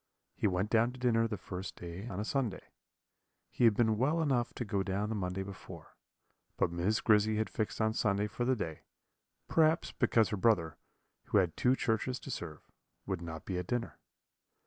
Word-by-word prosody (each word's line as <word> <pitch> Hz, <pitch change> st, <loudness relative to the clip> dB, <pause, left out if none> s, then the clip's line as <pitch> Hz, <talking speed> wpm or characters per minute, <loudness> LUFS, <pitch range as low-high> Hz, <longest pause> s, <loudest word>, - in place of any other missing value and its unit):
He -, -, 0 dB
went 95 Hz, +2 st, 0 dB
down 115 Hz, +1 st, +4 dB
to 130 Hz, -, -11 dB
dinner 115 Hz, -2 st, +3 dB
the 110 Hz, -2 st, -4 dB
first 90 Hz, +1 st, -6 dB
day 90 Hz, +5 st, -7 dB
on 100 Hz, -5 st, -5 dB
a 105 Hz, -, -2 dB
Sunday. 125 Hz, -5 st, -2 dB, 0.8 s
He 120 Hz, -, +2 dB
had 110 Hz, -3 st, +6 dB
been 110 Hz, -1 st, +2 dB
well 150 Hz, +6 st, +2 dB
enough 130 Hz, -7 st, +1 dB
to 120 Hz, -, -3 dB
go 100 Hz, -2 st, 0 dB
down 100 Hz, +2 st, -1 dB
the -, -, -1 dB
Monday 95 Hz, -1 st, -2 dB
before, 95 Hz, -4 st, -10 dB, 0.6 s
but -, -, +1 dB
Miss 90 Hz, +6 st, 0 dB
Grizzy 110 Hz, 0 st, +4 dB
had 110 Hz, -, -1 dB
fixed 110 Hz, -, -2 dB
on 110 Hz, 0 st, +2 dB
Sunday 105 Hz, -2 st, +1 dB
for 110 Hz, +4 st, -3 dB
the 130 Hz, +1 st, +2 dB
day; 80 Hz, -8 st, -4 dB, 0.7 s
perhaps 160 Hz, 0 st, +3 dB
because 115 Hz, -2 st, +2 dB
her 105 Hz, -, -2 dB
brother, 95 Hz, -7 st, +2 dB, 0.5 s
who -, -, +2 dB
had 90 Hz, -5 st, +2 dB
two 125 Hz, +1 st, +3 dB
churches 125 Hz, 0 st, -1 dB
to 140 Hz, -, -7 dB
serve, 80 Hz, -8 st, -6 dB, 0.4 s
would -, -, -3 dB
not 80 Hz, -1 st, -7 dB
be 90 Hz, -2 st, -2 dB
at 90 Hz, -, -5 dB
dinner. 120 Hz, -1 st, -3 dB
105 Hz, 190 wpm, -32 LUFS, 95-120 Hz, 0.8 s, had